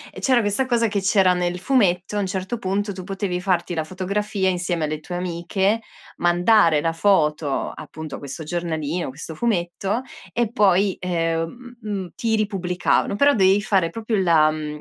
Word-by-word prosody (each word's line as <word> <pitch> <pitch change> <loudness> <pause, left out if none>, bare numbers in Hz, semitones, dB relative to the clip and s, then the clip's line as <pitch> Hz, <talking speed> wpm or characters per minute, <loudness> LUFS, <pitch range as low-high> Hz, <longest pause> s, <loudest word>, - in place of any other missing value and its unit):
E - - -7
c'era 255 -3 +3
questa 205 +5 0
cosa 235 -2 +2
che 205 -2 -1
c'era 190 -1 +4
nel 180 0 -1
fumetto, 190 -3 +1
a - - +1
un 200 - -1
certo 190 +5 -3
punto 200 +1 -1
tu 185 -1 -8
potevi 190 -1 -3
farti 180 -2 0
la 160 -2 -1
fotografia 190 +3 -2
insieme 175 -2 -1
alle 155 0 -2
tue 175 +3 -7
amiche, 180 +5 -1 0.4
mandare 175 -2 +4
la 165 +2 0
foto, 155 -6 +1
appunto, 155 -2 -8
a - - -11
questo 140 +2 -7
giornalino, 165 -1 -3
questo 150 +4 -8
fumetto 195 +2 -1 0.3
e 235 -2 0
poi, 200 -4 +3
ehm 175 +8 -3
mhmm, 200 -4 -4
ti 225 -1 0
ripubblicavano, 195 -3 0
però 285 +7 +5
dovevi 195 -2 +4
fare 190 -6 +2
proprio 220 -1 -2
la, 160 -4 +4
mhmm, 150 -1 -5
185 Hz, 170 wpm, -22 LUFS, 170-205 Hz, 0.4 s, però